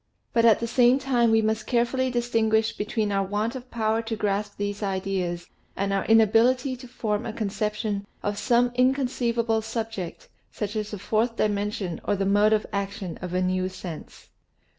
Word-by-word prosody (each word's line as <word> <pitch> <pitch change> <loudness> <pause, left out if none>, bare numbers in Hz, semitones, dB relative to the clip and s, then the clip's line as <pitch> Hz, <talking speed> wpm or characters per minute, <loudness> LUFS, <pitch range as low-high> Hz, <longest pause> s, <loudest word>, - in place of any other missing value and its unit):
But 230 -1 +4
at 225 -2 +6
the 235 - -2
same 245 +2 +4
time 255 -4 +2
we 225 0 +4
must 220 0 -1
carefully 255 +2 +1
distinguish 225 -2 +1
between 210 0 -1
our 195 -1 +1
want 210 +4 -1
of 255 0 -8
power 220 -1 0
to 225 0 -4
grasp 205 0 -2
these 205 0 -3
ideas 190 -3 -2 0.3
and 195 0 -1
our 195 - 0
inability 230 +4 +4
to 250 +1 -11
form 215 -2 -2
a 230 - -4
conception 210 -1 -2 0.2
of 205 0 -2
some 240 +3 +3
inconceivable 245 -3 +1
sub 225 0 -3
ject, 185 -6 -7 0.2
such 210 0 -4
as 215 -1 -3
a 210 - -4
fourth 225 +4 0
dimension 205 -4 -1
or 205 - +1
the 195 0 -1
mode 205 +2 +4
of 215 -1 +2
action 200 -2 -4
of 180 0 -4
a 185 - +2
new 185 0 0
sense. 180 -3 -9
215 Hz, 180 wpm, -25 LUFS, 200-235 Hz, 0.3 s, at